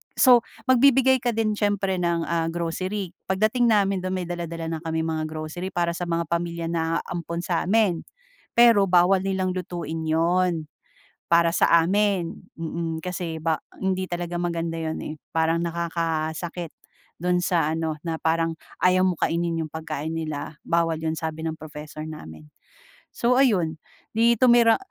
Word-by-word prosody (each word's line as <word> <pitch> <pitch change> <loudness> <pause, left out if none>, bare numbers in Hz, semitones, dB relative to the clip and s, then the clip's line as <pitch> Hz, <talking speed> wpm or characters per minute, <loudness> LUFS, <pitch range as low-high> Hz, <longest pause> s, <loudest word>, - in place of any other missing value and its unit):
so 250 -2 +7 0.3
magbibigay 260 0 +5
ka 240 -1 -1
din 215 -2 0
siyempre 200 -2 0
ng, 170 -1 +1
ah, 165 -1 0
grocery. 185 +3 -3
Pagdating 215 +6 +2
namin 200 -3 +3
do'n, 185 0 -3
may 180 -2 -3
dala-dala 170 -2 -4
na - - -9
kaming 160 0 -1
mga 155 -1 -1
grocery 155 +4 -6
para 170 -1 +1
sa 175 +1 -4
mga 170 0 0
pamilya 170 -1 -2
na 165 0 0
aampon 170 -1 -4
sa 175 -1 -1
amin. 195 -4 +2 0.5
Pero 235 -4 +6
bawal 185 +2 +4
nilang 190 -1 0
lutuin 170 -3 -4
'yon, 165 0 +1 0.6
para 170 0 +5
sa - - +3
amin, 195 -1 +1 0.2
mm, 165 0 -4
kasi 175 -2 -4
ba 160 -1 +1 0.2
hindi 190 -1 0
talaga 175 -1 -4
maganda 170 -1 -2
'yon, 160 -1 -3
eh. 155 - -5 0.2
Parang 165 +1 +1
nakakasakit 165 0 -2 0.5
do'n 180 +1 +1
sa 165 -3 +1
ano, 160 -1 -2
na 160 -1 -3
parang 165 0 +1 0.3
ayaw 185 0 +5
mong 180 -3 +1
kainin 165 -1 -1
yung 155 - -12
pagkain 160 -1 -4
nila. 155 -1 -5
Bawal 165 -1 0
'yon 160 0 -2
sabi 160 0 -4
ng 160 0 -3
professor 155 0 -8
namin. 80 - -9 0.6
So 240 +1 +1
ayun, 175 - +2 0.3
'di 230 +1 +4
tumira 235 -2 +6
170 Hz, 155 wpm, -24 LUFS, 160-185 Hz, 0.6 s, so